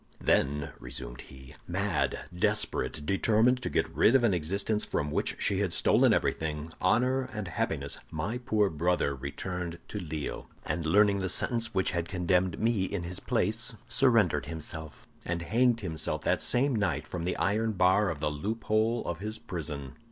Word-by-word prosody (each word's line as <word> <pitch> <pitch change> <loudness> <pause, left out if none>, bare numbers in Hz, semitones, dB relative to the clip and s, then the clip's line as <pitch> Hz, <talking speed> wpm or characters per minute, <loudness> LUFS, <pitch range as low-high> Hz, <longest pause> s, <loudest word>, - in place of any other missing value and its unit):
"Then," 70 +1 +1
resumed - - -6
he, 65 -1 -13
"mad, - - 0
desperate, 75 -3 0
determined 110 +7 +3
to - - -2
get - - +1
rid 120 - +5
of 130 - +5
an 115 -5 +4
existence 100 +6 0
from 75 0 -2
which - - -1
she 95 - 0
had 100 -4 0
stolen - - +4
everything, 75 0 -1
honor 125 +7 +2
and 105 -3 -4
happiness, 90 - -2
my 100 +11 -3
poor 110 -5 +1
brother 85 -2 +1
returned 85 +6 -5
to 105 - -4
Lille, 80 -5 -5 0.2
and 85 -2 -2
learning 100 +3 +4
the 95 -1 -1
sentence 115 +1 0
which 95 - +2
had 85 -1 -2
condemned 90 -1 +1
me 110 -4 +2
in 95 -2 -3
his 90 +1 -4
place, - - 0
surrendered 115 - +3
himself, 80 -2 -7 0.2
and 85 0 -3
hanged 120 +4 +2
himself 80 -5 -2
that - - +1
same 130 +1 +2
night 85 -9 0
from 85 -2 -5
the 90 +1 -1
iron 110 +2 +1
bar 95 +1 +3
of 85 - -3
the 75 0 0
loophole 110 +7 0
of 85 -1 -3
his 110 +2 -4
prison. 75 -9 -5
95 Hz, 165 wpm, -29 LUFS, 80-110 Hz, 0.2 s, rid